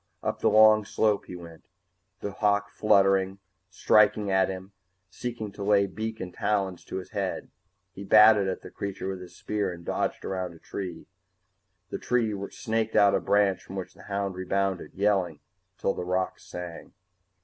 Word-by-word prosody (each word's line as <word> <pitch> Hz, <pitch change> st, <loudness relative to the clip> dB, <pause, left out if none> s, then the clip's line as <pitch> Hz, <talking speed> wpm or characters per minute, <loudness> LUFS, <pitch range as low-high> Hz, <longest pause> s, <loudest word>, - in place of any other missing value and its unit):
Up -, -, -2 dB
the -, -, +3 dB
long 110 Hz, 0 st, +6 dB
slope 105 Hz, 0 st, +1 dB
he 90 Hz, -, -7 dB
went. 85 Hz, -2 st, -11 dB, 0.6 s
The 100 Hz, -, -3 dB
hawk 100 Hz, 0 st, +1 dB
fluttered, 95 Hz, -2 st, +3 dB, 0.3 s
striking 105 Hz, +1 st, +3 dB
at 95 Hz, 0 st, +3 dB
him, 95 Hz, +1 st, -7 dB, 0.4 s
seeking 115 Hz, -2 st, -5 dB
to 100 Hz, +1 st, -7 dB
lay 100 Hz, -1 st, +4 dB
beak 110 Hz, +3 st, -5 dB
and 90 Hz, -1 st, -6 dB
talons 95 Hz, -4 st, -2 dB
in -, -, -2 dB
his 95 Hz, -, -7 dB
head. 100 Hz, -3 st, -3 dB, 0.4 s
He 100 Hz, -, -8 dB
batted 105 Hz, 0 st, +6 dB
at 95 Hz, -, -3 dB
the -, -, -10 dB
creature 100 Hz, -1 st, -5 dB
with 95 Hz, -1 st, -5 dB
his 90 Hz, -, -12 dB
spear 105 Hz, -3 st, -2 dB
and 85 Hz, -1 st, -10 dB
dodged -, -, -2 dB
around 90 Hz, -3 st, -3 dB
a -, -, -13 dB
tree. 90 Hz, -3 st, -6 dB, 0.9 s
The -, -, -3 dB
tree 120 Hz, -3 st, +1 dB, 0.2 s
snaked 110 Hz, 0 st, -2 dB
out 100 Hz, -1 st, +6 dB
a -, -, +3 dB
branch 100 Hz, -1 st, +2 dB
from 95 Hz, -, -10 dB
which 95 Hz, -2 st, -5 dB
the -, -, -16 dB
hound 100 Hz, -1 st, -1 dB
rebounded, 95 Hz, 0 st, -2 dB
yelling 95 Hz, -5 st, +1 dB, 0.4 s
till 95 Hz, -, 0 dB
the -, -, -5 dB
rocks 90 Hz, +1 st, -2 dB
rang. 90 Hz, -2 st, -7 dB
100 Hz, 170 wpm, -27 LUFS, 95-105 Hz, 0.9 s, long